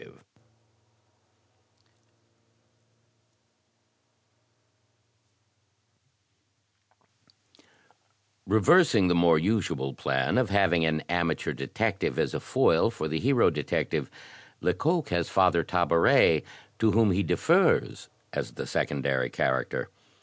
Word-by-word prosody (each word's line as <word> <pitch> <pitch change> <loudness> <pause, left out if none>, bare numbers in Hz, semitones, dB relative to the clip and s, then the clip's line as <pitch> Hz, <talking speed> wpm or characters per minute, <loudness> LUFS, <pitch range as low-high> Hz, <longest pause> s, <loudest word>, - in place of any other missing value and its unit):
Reversing 110 - +4
the - - +3
more 85 -2 +3
usual 80 -7 -2
plan 65 - -1
of 125 -5 -1
having 95 -4 +2
an 80 -1 -1
amateur 85 -2 -2
detective 70 +1 -3
as - - -1
a - - -3
foil 80 +7 +1
for 115 -9 -5
the 80 +1 -3
hero 125 -7 +2
detective, 75 -3 -3 0.5
Lecoq 165 0 -1
has 85 -2 -2
Father, 90 -3 +2
Tabaret 85 0 +3 0.4
to 110 - +2
whom 110 0 +2
he 95 +2 0
defers, - - +1 0.2
as - - -5
the - - -7
secondary 65 -3 -2
character. 65 -1 -2
85 Hz, 85 wpm, -26 LUFS, 80-105 Hz, 0.5 s, Reversing